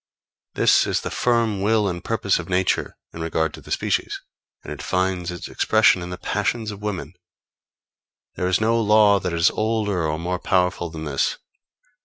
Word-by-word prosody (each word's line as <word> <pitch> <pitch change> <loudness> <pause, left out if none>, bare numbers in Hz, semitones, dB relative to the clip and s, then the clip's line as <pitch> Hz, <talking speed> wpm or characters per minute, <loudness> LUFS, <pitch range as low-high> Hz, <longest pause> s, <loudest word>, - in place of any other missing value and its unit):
This - - +4
is - - 0
the - - -5
firm 115 -5 +1
will 105 0 +2
and 85 -2 -4
purpose 100 -5 0
of 90 - -7
Nature 95 0 0 0.2
in 85 - -7
regard 80 -1 -1
to - - -10
the - - -15
species, - - -1 0.4
and - - -6
it - - -9
finds 90 -1 -1
its 90 -1 -6
expression 110 -4 +3
in 85 - -6
the 90 - -6
passions 110 +3 -2
of 105 0 -10
women. 105 -3 -4 1.2
There 90 - -1
is 95 0 +2
no 115 +1 +2
law 105 -2 +5
that 90 -1 -3
is 85 0 +3
older 105 -6 -1
or 75 0 -2
more 90 +2 -3
powerful 90 -2 0
than 80 -1 -7
this. 70 -3 -1
95 Hz, 180 wpm, -22 LUFS, 85-105 Hz, 1.2 s, law